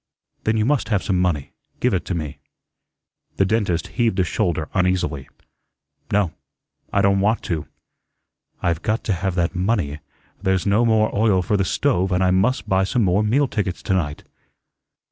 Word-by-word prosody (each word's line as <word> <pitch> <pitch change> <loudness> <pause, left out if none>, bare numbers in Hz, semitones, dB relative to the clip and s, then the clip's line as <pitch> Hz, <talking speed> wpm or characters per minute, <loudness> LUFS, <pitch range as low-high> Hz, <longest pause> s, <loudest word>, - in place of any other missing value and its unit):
"Then 110 +1 +2
you 110 - +2
must 140 -1 +1
have 100 -4 +1
some 95 -2 0
money. 80 -7 -1 0.3
Give 125 - +1
it 90 - -1
to 95 - -2
me." 75 -3 -5 1.0
The 95 - +3
dentist 100 -4 0
heaved 115 -3 0
a - - +4
shoulder 85 -3 -1
uneasily. 90 -7 0 0.8
"No, 100 -5 +1 0.6
I - - +2
don' 100 0 +3
want 105 +3 +1
to." 80 -4 -3 1.0
"I've 85 -1 0
got 110 +5 -1
to 105 - 0
have 90 +1 -2
that 85 0 0
money. 90 -6 -1 0.4
There's 95 -2 +1
no 105 +4 +3
more 110 -1 +2
oil 100 -3 +3
for 105 - 0
the 100 - +2
stove, 95 0 +1
and 90 +1 +2
I 90 - +3
must 105 +7 +1
buy 95 -1 +2
some 115 +5 +1
more 95 +1 +3
meal 130 +7 +2
tickets 100 -7 -3
to - - 0
night." 75 -6 -1
95 Hz, 175 wpm, -22 LUFS, 90-110 Hz, 1.0 s, a